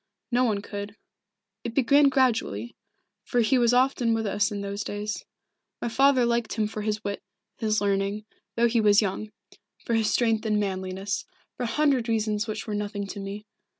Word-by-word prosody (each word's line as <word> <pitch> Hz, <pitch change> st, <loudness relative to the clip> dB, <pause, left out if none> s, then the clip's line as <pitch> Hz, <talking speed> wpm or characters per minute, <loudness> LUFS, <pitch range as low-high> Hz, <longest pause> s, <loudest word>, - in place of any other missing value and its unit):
No 250 Hz, +1 st, +3 dB
one 205 Hz, -4 st, 0 dB
could. 205 Hz, +1 st, -6 dB, 0.7 s
It 235 Hz, -1 st, -5 dB
began 280 Hz, +2 st, +5 dB
gradually, 225 Hz, -, 0 dB, 0.5 s
for 240 Hz, +3 st, +1 dB
he 250 Hz, +3 st, +3 dB
was 240 Hz, -1 st, +4 dB
often 250 Hz, -2 st, +3 dB
with 225 Hz, 0 st, -1 dB
us 205 Hz, 0 st, +1 dB
in 205 Hz, -1 st, -3 dB
those 200 Hz, +1 st, -4 dB
days. 210 Hz, +1 st, -4 dB, 0.5 s
My 240 Hz, -, -2 dB
father 265 Hz, +1 st, +4 dB
liked 235 Hz, -1 st, 0 dB
him 215 Hz, -1 st, 0 dB
for 215 Hz, 0 st, -4 dB
his 215 Hz, 0 st, -2 dB
wit, 200 Hz, 0 st, -3 dB, 0.4 s
his 215 Hz, -2 st, +1 dB
learning, 200 Hz, +1 st, 0 dB, 0.3 s
though 235 Hz, +1 st, +4 dB
he 230 Hz, 0 st, +2 dB
was 210 Hz, 0 st, +5 dB
young; 205 Hz, +2 st, -3 dB, 0.6 s
for 235 Hz, -, -1 dB
his 220 Hz, -2 st, +2 dB
strength 225 Hz, -2 st, +2 dB
and 210 Hz, -1 st, +2 dB
manliness 190 Hz, 0 st, -3 dB, 0.3 s
for 245 Hz, -, -3 dB
a 230 Hz, -, -3 dB
hundred 275 Hz, -6 st, +2 dB
reasons 215 Hz, 0 st, 0 dB
which 215 Hz, 0 st, -4 dB
were 215 Hz, -, -4 dB
nothing 205 Hz, 0 st, -3 dB
to 200 Hz, +1 st, -7 dB
me. 200 Hz, +2 st, -6 dB
215 Hz, 185 wpm, -26 LUFS, 205-235 Hz, 0.7 s, began